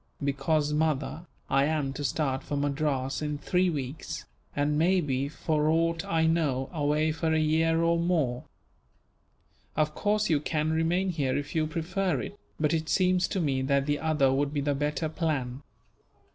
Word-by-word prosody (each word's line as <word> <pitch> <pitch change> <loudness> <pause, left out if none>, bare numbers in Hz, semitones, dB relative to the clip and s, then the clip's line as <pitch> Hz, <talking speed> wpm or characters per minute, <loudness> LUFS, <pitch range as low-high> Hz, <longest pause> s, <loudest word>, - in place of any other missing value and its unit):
"Because, 145 +2 +1
mother, 155 +2 -1 0.2
I 135 +1 +3
am 150 -3 0
to 145 - -5
start 135 -2 0
for 145 - -4
Madras 140 -2 -1
in 150 -1 -2
three 180 +5 +1
weeks; 140 -2 -5 0.3
and 145 +1 +1
may 180 +5 +3
be, 140 -3 -1
for 155 0 0
aught 165 +1 +1
I 160 -1 +1
know, 150 -5 +1
away 150 0 +1
for 160 +1 -1
a 160 - +3
year 165 +1 +2
or 170 0 +3
more. 155 -8 0 1.3
Of 150 0 +1
course 210 +4 +1
you 155 -3 +3
can 155 +1 -1
remain 170 +4 +1
here 140 -6 0
if 145 +4 -4
you 155 -2 +1
prefer 165 0 -1
it, - - -6 0.2
but 150 0 +2
it 160 -1 -1
seems 185 -1 +3
to 195 - -2
me 140 -6 0
that 140 +1 +1
the 145 0 0
other 150 -4 +2
would 140 +1 +1
be 145 -1 -1
the 145 +1 +1
better 150 +2 -1
plan." 145 -6 -2
155 Hz, 175 wpm, -28 LUFS, 140-165 Hz, 1.3 s, I